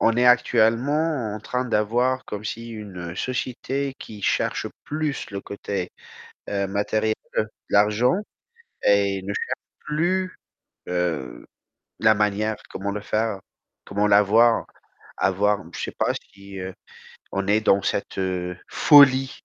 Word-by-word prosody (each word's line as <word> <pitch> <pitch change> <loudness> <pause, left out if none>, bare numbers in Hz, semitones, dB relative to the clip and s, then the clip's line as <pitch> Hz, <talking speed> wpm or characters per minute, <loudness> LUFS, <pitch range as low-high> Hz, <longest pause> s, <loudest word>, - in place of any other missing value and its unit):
est 125 +1 +3
actuellement 125 +2 +3
en 110 - -6
train 125 +4 -2
d'avoir 120 +3 +1
comme 105 0 -6
si 115 +2 -5
une 95 -6 -7
société 130 +3 -2
qui 105 -2 -10
cherche - - 0 0.2
plus 150 -2 -3
le 100 0 -4
côté, 100 -2 -4 0.6
heu 100 -1 -1
matériel, 110 +2 0 0.5
l'argent, 105 +6 +4 0.7
et 100 -1 +3
ne 100 +2 -4
cherche - - -4
plus, 185 +5 -1 0.5
heu, 80 -9 -2 0.6
la 110 -1 +6
manière, 105 +1 0
comment 100 +1 -4
le 105 - -3
faire, 110 -1 -1 0.5
comment 100 +1 0
l'avoir, 105 +3 +5 0.5
avoir, 100 +2 +2
je - - -6
sais - - -4
pas - - +1 0.2
si, 100 0 -11
heu, 95 0 -5 0.6
on 95 0 -2
est 105 +2 +3
dans 100 -2 +4
cette - - -2 0.5
folie. 135 -3 +6
105 Hz, 125 wpm, -24 LUFS, 100-125 Hz, 0.7 s, la